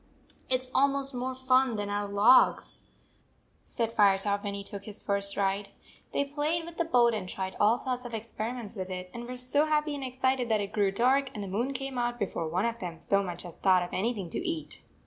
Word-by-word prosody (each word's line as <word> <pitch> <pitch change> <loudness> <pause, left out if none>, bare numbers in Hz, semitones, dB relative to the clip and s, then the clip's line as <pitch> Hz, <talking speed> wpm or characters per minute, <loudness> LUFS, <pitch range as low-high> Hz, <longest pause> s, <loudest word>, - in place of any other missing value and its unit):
"It 255 -1 +2
s 255 - -9
almost 275 0 +3
more 255 +1 -3
fun 260 -1 +3
than 205 -1 -3
our 205 0 -1
logs," 205 +6 +4 0.8
said 230 -2 -2
Firetop, 200 0 +3
when 200 -1 -3
he 200 - -5
took 200 -1 -6
his 210 -2 -5
first 200 -1 -1
ride. 200 0 0 0.4
They 280 - 0
played 300 +4 -1
with 340 0 -10
the 340 - +1
boat 240 -7 +4
and 190 -4 -3
tried 190 0 -4
all 215 +3 +4
sorts 250 -1 -3
of 240 -2 -6
experiments 225 0 -5
with 185 -2 -5
it, 180 0 -6
and 235 0 -7
were 250 0 -6
so 255 +4 +2
happy 300 -1 +1
and 280 -1 -5
excited 260 -1 0
that 220 -1 +3
it 200 +1 -4
grew 205 -2 +2
dark 260 +6 +2
and 210 - -4
the - - -5
moon 230 +8 -1
came 270 -1 -4
out 240 0 -1
before 180 -6 -2
one 180 +6 0
of 235 0 -2
them 170 -5 -6
so 200 +4 +1
much 180 -2 -5
as 175 - -10
thought 185 -2 +4
of 175 - -8
anything 200 -4 -2
to - - -2
eat. 335 -3 -4
230 Hz, 225 wpm, -29 LUFS, 200-260 Hz, 0.8 s, logs